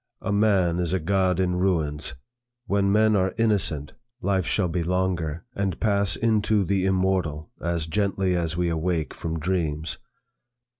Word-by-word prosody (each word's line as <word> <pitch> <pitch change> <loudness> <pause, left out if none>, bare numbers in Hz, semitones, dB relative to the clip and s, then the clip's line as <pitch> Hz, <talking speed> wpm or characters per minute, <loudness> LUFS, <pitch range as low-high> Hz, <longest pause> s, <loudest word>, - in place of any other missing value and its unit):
'A - - -1
man 100 -5 +2
is 90 0 0
a 95 - +1
god 95 +1 +1
in 90 -1 +1
ruins. 80 -5 0 0.5
When 100 -2 +1
men 110 +1 +4
are 95 -1 +1
innocent, 100 -10 +1 0.3
life 95 -5 0
shall 95 -4 +1
be 85 +1 -1
longer, 90 -2 -1
and 100 -4 -1
shall - - -26
pass 100 -2 +2
into 110 -2 +2
the 95 0 +1
immortal, 95 -5 0
as 85 -1 -1
gently 95 +1 0
as 85 -1 -1
we 90 0 +1
awake 80 -1 -1
from 80 0 -4
dreams. 80 -2 -2
90 Hz, 155 wpm, -25 LUFS, 80-100 Hz, 0.5 s, men